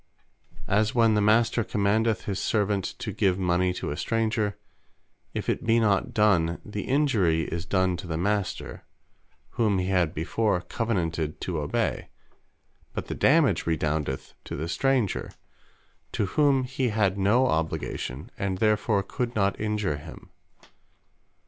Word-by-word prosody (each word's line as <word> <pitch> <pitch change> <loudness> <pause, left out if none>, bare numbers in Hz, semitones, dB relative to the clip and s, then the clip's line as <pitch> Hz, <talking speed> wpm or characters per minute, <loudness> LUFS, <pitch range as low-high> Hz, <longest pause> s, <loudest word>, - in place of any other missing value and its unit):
As 105 +3 +1
when 115 -2 +4
The 105 - +2
Master 115 +2 +3
commandeth 105 +1 +1
his 100 -2 -3
servant 105 -2 0
to 105 - -4
give 95 -2 +1
mony 90 0 +1
to - - -4
a - - -3
stranger; 110 -2 -1 0.8
if - - -3
it - - -1
be 115 +1 +3
not 105 -4 +2
done, 90 -6 +2
the 105 -1 -5
Injury 110 - +2
is 85 +2 -4
done 95 0 +1
to 90 - -8
the 80 -1 -2
Master, 100 0 -2 0.7
whom 105 -4 +1
he 90 0 -1
had 90 -4 +1
before 90 +5 0
Covenanted 85 -6 -2
to 85 -4 -2
obey; 75 -1 -2 0.8
but - - -5
the - - -3
dammage - - +3
redoundeth 75 -4 -1
to - - -5
the 80 +3 -3
stranger, 125 +4 0 0.8
to 105 - 0
whom 140 +4 +2
he 130 0 -1
had 100 -3 +1
no 110 +7 +4
Obligation; 80 - -2
and 95 -1 -1
therefore 105 -1 +2
could 120 +4 -3
not 100 -2 +1
Injure 105 -8 -1
him. 75 +2 -12
100 Hz, 140 wpm, -26 LUFS, 85-110 Hz, 0.8 s, when